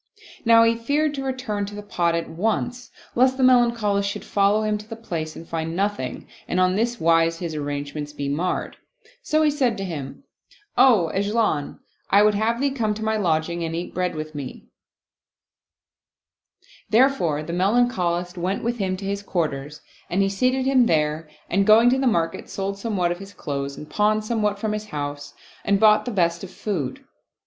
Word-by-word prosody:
Now 230 0 +7
he 230 0 +4
feared 285 +6 0
to 275 -2 -4
return 250 -6 -3
to 205 - -8
the 205 - -7
pot 170 -4 0
at 170 - -2
once, 225 +7 -2 0.2
lest 260 +2 +3
the 265 - +1
Melancholist 235 -5 +3
should - - -6
follow 205 +2 +2
him 210 -1 0
to 210 - -12
the 225 - -5
place 165 -8 -5
and 165 - -10
find 165 0 -3
nothing 195 -9 -2 0.2
and 185 - 0
on 185 0 +3
this 235 +4 -1
wise 165 0 +3
his 170 -2 -4
arrangements 145 0 -4
be 145 -1 -4
marred; 160 +6 -2 0.4
so 310 -9 +1
he 300 - +4
said 265 -5 0
to 195 - -4
him, 155 - -6 0.3
" - - -43 0.2
O 210 -11 +5
'Ajlan, 200 -7 0 0.3
I 200 +1 +6
would 210 0 +4
have 220 +3 0
thee 280 +1 +1
come 220 -6 -1
to 220 - -6
my 220 0 +1
lodging 170 -3 0
and 165 0 -3
eat 170 +1 -5
bread 180 -1 -1
with 155 0 -6
me/' 140 -3 -7 2.3
Therefore 215 - +3
the 170 +2 -5
Melancholist 180 -3 +1
went 185 +3 -2
with 235 +1 -2
him 185 -2 -1
to 195 - -7
his 200 0 -2
quarters 150 -6 -3 0.3
and 195 +3 +2
he 195 - +1
seated 255 +6 +1
him 260 -3 +4
there 155 0 0 0.2
and 195 +3 +2
going 225 +3 +7
to 260 - +2
the 265 - +1
market, 165 -7 0
sold 195 0 -4
somewhat 195 -5 0
of 175 - -4
his 195 0 -11
clothes 140 -3 -4
and 150 - -9
pawned 215 +3 +1
somewhat 210 -3 0
from 215 +1 -2
his 215 0 -4
house 145 -4 -6 0.3
and 200 0 +2
bought 215 0 +5
the - - -2
best 170 -4 0
of 190 - -7
food. 175 -9 -4
200 Hz, 190 wpm, -23 LUFS, 165-230 Hz, 2.3 s, Now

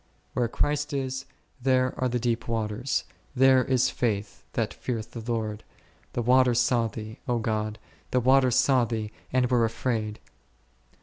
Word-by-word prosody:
Where 120 -1 +1
Christ 145 +5 -1
is, 135 -1 -2 0.4
there 130 0 +2
are 130 - 0
the 125 - 0
deep 120 -1 -1
waters, 115 +2 -1 0.3
there 130 0 +6
is 130 -1 +2
faith 105 -4 -2
that - - -1
feareth 115 -4 -4
the 115 - -6
Lord; 110 -2 -2 0.5
the 120 - -1
waters 125 0 +4
saw 120 -1 +2
Thee, 110 0 -8
God, 110 -3 -1 0.3
the 125 - +2
waters 130 0 +4
saw 130 -2 +4
Thee, 110 -2 -3 0.2
and 125 -1 +3
were 120 -2 +4
afraid 115 -2 -1
h. - - -29
120 Hz, 150 wpm, -27 LUFS, 110-130 Hz, 0.5 s, there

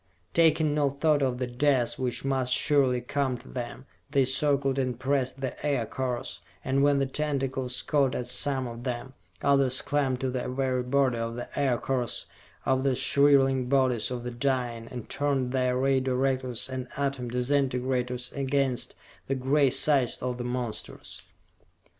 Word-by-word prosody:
Taking 160 -2 +3
no 145 -2 +2
thought 145 +1 +1
of 130 -2 0
the 125 - -1
death 125 0 +1
which 130 0 -2
must 130 -2 0
surely 130 -2 +4
come 130 0 -1
to 120 - -16
them, 125 +1 -6 0.2
they 140 -2 +3
circled 140 0 +2
and 125 -3 -2
pressed 135 -1 -1
the 130 - -5
Aircars; 130 -2 -2 0.2
and 135 +1 +1
when 145 0 +4
the 135 - +2
tentacles 135 -3 -2
caught 140 -4 +1
at 125 - -2
some 135 +1 -1
of 120 0 -7
them, 125 +1 -4 0.3
others 135 -2 +3
climbed 135 -3 0
to 130 -1 -1
the 125 0 -3
very 130 -1 0
body 125 -1 +1
of 115 0 -3
the 120 - -5
Aircars, 130 -2 0 0.4
over 130 0 +2
the 135 -1 +1
shriveling 135 -1 +3
bodies 130 -5 +2
of 125 -1 -4
the 125 - -4
dying, 120 -2 -1
and 120 -2 -8
turned 140 -3 -1
their 125 -1 +1
Ray 135 +1 +2
Directors 130 -1 0
and 130 -1 -5
Atom 140 -3 -2
Disintegrators 125 -1 0
against 135 -2 -1 0.3
the 135 - 0
gray 135 +2 +3
sides 135 -2 +2
of 125 -1 -3
the - - -2
monsters. 120 -3 -5
130 Hz, 160 wpm, -27 LUFS, 125-140 Hz, 0.4 s, surely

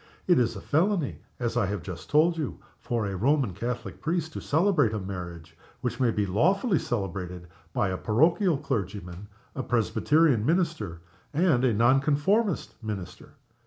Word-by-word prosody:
"It 175 -5 +4
is 120 -2 +1
felony, 170 -1 0 0.2
as 120 -2 -2
I 120 -5 +2
have 100 -3 -3
just 90 -2 -8
told 160 +4 +4
you, 155 -4 -3 0.2
for 120 -3 -2
a 100 -1 -3
Roman 130 +1 +1
Catholic 120 +6 -5
priest 160 0 -1
to - - -5
celebrate 155 - +2
a 105 - -1
marriage 85 -4 -7 0.3
which 120 0 -3
may 125 -2 +3
be 105 -2 0
lawfully 180 - +2
celebrated 90 -5 -4 0.2
by 95 - 0
a 95 - -2
parochial 160 - +2
clergyman, 100 -8 -4 0.3
a 135 - -3
Presbyterian 130 +2 +2
mini 170 +8 +3
ster, 105 - -8 0.3
and 155 -6 +3
a 130 - +4
Non 120 +5 +5
conformist 160 - 0
minister. 95 -5 -7
120 Hz, 160 wpm, -27 LUFS, 100-155 Hz, 0.3 s, Non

